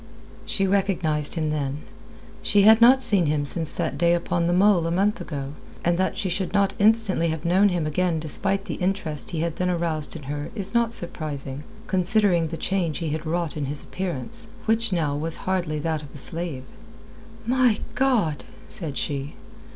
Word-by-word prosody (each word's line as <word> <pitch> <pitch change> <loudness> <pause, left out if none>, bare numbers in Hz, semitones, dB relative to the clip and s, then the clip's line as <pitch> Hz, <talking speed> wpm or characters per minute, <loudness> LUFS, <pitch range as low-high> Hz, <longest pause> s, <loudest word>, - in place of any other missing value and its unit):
She 200 -3 +1
recognized 185 -7 +1
him 155 -2 -1
then. 145 -1 -3 0.6
She 205 -1 +3
had 220 +2 +7
not 260 +3 +7
seen 200 -8 +4
him 145 -1 0
since 160 +2 +1
that 170 -2 -2
day 170 0 +4
upon 170 0 -1
the - - +1
mole 185 -2 +4
a - - -1
month 205 +6 +1
ago, 140 -2 -5 0.3
and 175 0 +3
that 190 - 0
she 195 - -1
should 185 +2 -2
not 200 -1 +2
instantly 210 -5 +3
have 160 -1 -3
known 190 +4 +4
him 175 -4 -1
again 165 +2 0
despite 195 +6 -1
the 200 - -6
interest 160 -6 -3
he 165 -3 -3
had 165 -1 -2
then 180 0 0
aroused 165 -4 -2
in 155 - -8
her 145 +2 -5
is 200 -1 -3
not 235 -1 +3
surprising, 145 -5 -2 0.2
considering 190 -3 +2
the 165 +1 -6
change 175 -5 -1
he 165 -3 -3
had 155 +2 -4
wrought 170 -1 -2
in 150 -2 -2
his 145 +1 -4
appearance, 180 - -4 0.2
which 225 0 +1
now 155 -5 0
was 160 +2 0
hardly 175 -5 -1
that 155 0 -2
of 145 - -11
a - - -7
slave. 160 -2 -4 0.8
"My 250 -2 +3 0.2
God!" 225 - +1 0.2
said 150 -6 -2
she. 140 0 -3
170 Hz, 185 wpm, -24 LUFS, 155-195 Hz, 0.8 s, had